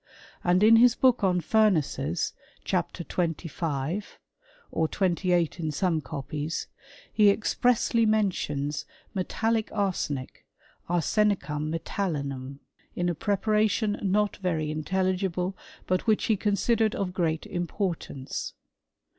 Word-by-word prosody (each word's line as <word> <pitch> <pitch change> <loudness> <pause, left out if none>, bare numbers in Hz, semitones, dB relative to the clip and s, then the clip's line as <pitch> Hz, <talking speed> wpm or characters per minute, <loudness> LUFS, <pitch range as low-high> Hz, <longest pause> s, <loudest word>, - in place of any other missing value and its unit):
And 180 +2 +3
in 225 +1 +8
his 240 0 +6
book 255 -4 +3
on 180 -2 +3
Furnaces, 160 - +1 0.3
chapter 175 - -1
25 165 0 -3 0.5
(or 160 - +1
28 175 -2 +1
in 160 -2 -1
some 165 +1 0
copies), 150 +3 -4 0.5
he 210 -2 +6
expressly 230 +2 +2
mentions 150 -9 0 0.3
metallic 220 +3 0
arsenic 180 -10 -2 0.5
(arsenicum 175 -4 +1
m^tallinum), 140 -8 -3 0.4
in 175 0 0
a - - +1
preparation 210 +4 +1
not 205 +1 +1
very 160 -5 -1
in^ 155 0 -4
telligible, 185 0 0 0.3
but 185 +3 0
which 215 -1 +3
he 220 - +3
considered 215 +2 +1
of 185 -2 -2
great 165 -3 0
importanee. 175 -6 -3
180 Hz, 105 wpm, -27 LUFS, 160-210 Hz, 0.5 s, in